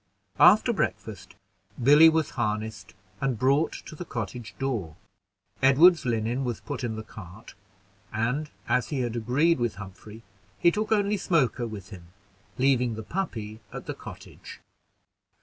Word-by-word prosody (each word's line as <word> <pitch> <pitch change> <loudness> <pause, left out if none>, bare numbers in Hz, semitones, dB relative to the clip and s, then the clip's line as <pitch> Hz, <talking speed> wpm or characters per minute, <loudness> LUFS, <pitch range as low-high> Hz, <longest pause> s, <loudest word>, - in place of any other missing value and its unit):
After - - +6
breakfast, - - -4 0.5
Billy 150 +5 +8
was 160 -2 0
harnessed 110 -2 -3 0.3
and 135 -4 0
brought 140 +7 +2
to - - -10
the 165 - -6
cottage 115 - -6
door. 110 - -3 0.7
Edward's 155 +3 +6
linen 115 +3 -1
was 120 -4 -3
put 140 -3 -6
in 115 -2 -2
the 110 - -6
cart, 100 -1 -12 0.6
and 125 +8 -1 0.2
as 125 +1 +1
he 140 -4 -1
had 120 -1 -2
agreed 135 +8 +2
with 120 -2 -1
Humphrey, 105 +3 -11 0.3
he 170 - +4
took 215 +4 -3
only 205 -1 +2
Smoker 135 -10 +1
with 105 -2 -9
him, 90 -4 -11 0.5
leaving 125 -3 +2
the 110 - -6
puppy 110 - -4
at - - -8
the - - -4
cottage. - - -11
120 Hz, 145 wpm, -26 LUFS, 110-145 Hz, 0.7 s, Billy